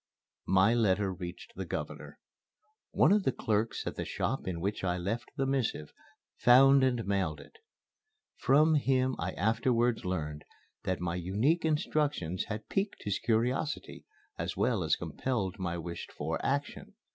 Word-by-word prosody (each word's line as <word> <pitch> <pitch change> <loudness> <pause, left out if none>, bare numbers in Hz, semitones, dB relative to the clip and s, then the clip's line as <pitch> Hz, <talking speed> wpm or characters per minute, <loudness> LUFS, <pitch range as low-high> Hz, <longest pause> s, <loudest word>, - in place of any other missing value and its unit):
My 95 +4 +4
letter 100 -4 +2
reached 90 - -8
the - - -4
Governor. - - -6 0.7
One - - +4
of 210 +1 +5
the 130 - +1
clerks 110 -1 -1
at - - -4
the - - -2
shop - - -2
in 90 -2 -2
which 100 +4 -2
I 90 -1 0
left 100 +7 -3
the 135 - +1
missive 130 - -1 0.5
found 135 +2 +7
and 125 -3 +1
mailed 95 -6 -1
it. - - -15 0.8
From 150 +4 +4
him 130 -3 +2
I 90 +3 -2
afterwards 115 +2 +1
learned 75 -5 -3 0.4
that 95 -1 -1
my 85 -1 -1
unique 105 - +1
instructions 150 - 0
had 110 -1 -6
piqued 195 +1 -2
his 100 -2 -1
curiosity, 125 +6 -1 0.4
as - - -3
well - - +1
as - - +2
compelled 105 -7 -3
my 90 -2 -2
wished 85 0 -6
for 80 +3 -3
action. 140 +1 -2
110 Hz, 150 wpm, -31 LUFS, 90-135 Hz, 0.8 s, found